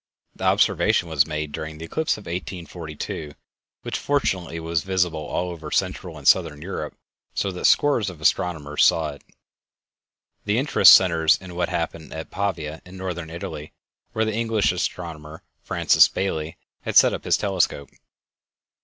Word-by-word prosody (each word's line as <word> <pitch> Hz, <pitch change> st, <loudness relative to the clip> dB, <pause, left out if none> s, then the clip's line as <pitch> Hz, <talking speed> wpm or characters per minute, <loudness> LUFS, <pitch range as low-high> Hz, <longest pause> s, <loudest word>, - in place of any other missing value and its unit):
The -, -, -5 dB
observation 85 Hz, -, +2 dB
was 75 Hz, -2 st, +2 dB
made 75 Hz, -1 st, -4 dB
during 80 Hz, +1 st, -6 dB
the 80 Hz, -, -7 dB
eclipse 160 Hz, -, -1 dB
of 105 Hz, -, -11 dB
1842, 85 Hz, -4 st, -6 dB, 0.5 s
which -, -, -3 dB
fortunately 95 Hz, -, -1 dB
was 80 Hz, -1 st, -1 dB
visible 90 Hz, -3 st, 0 dB
all 90 Hz, +4 st, -3 dB
over 80 Hz, -3 st, -8 dB
Central -, -, -2 dB
and -, -, -6 dB
Southern 75 Hz, -, +4 dB
Europe 90 Hz, +6 st, -6 dB, 0.4 s
so 100 Hz, -, -1 dB
that 90 Hz, -, -5 dB
scores 120 Hz, -9 st, +3 dB
of 90 Hz, -4 st, -11 dB
astronomers 75 Hz, -1 st, +1 dB
saw 80 Hz, -2 st, +3 dB
it. 70 Hz, -, -13 dB, 1.2 s
The 105 Hz, +1 st, +1 dB
interest 135 Hz, +4 st, +7 dB
centers 85 Hz, -4 st, +4 dB
in 95 Hz, -1 st, -11 dB
what 90 Hz, 0 st, -1 dB
happened 85 Hz, -2 st, -4 dB
at 80 Hz, -, -7 dB
Pavia 80 Hz, -6 st, -3 dB
in 90 Hz, +1 st, -12 dB
Northern 90 Hz, -3 st, -5 dB
Italy, 80 Hz, -2 st, -7 dB, 0.4 s
where 110 Hz, 0 st, 0 dB
the 110 Hz, -, -2 dB
English 110 Hz, -2 st, +1 dB
astronomer 80 Hz, -4 st, -5 dB, 0.2 s
Francis -, -, +4 dB
Baily 80 Hz, -4 st, -3 dB, 0.3 s
had -, -, -5 dB
set -, -, +7 dB
up -, -, -5 dB
his -, -, +2 dB
telescope. 95 Hz, -8 st, -1 dB
85 Hz, 155 wpm, -23 LUFS, 80-95 Hz, 1.2 s, interest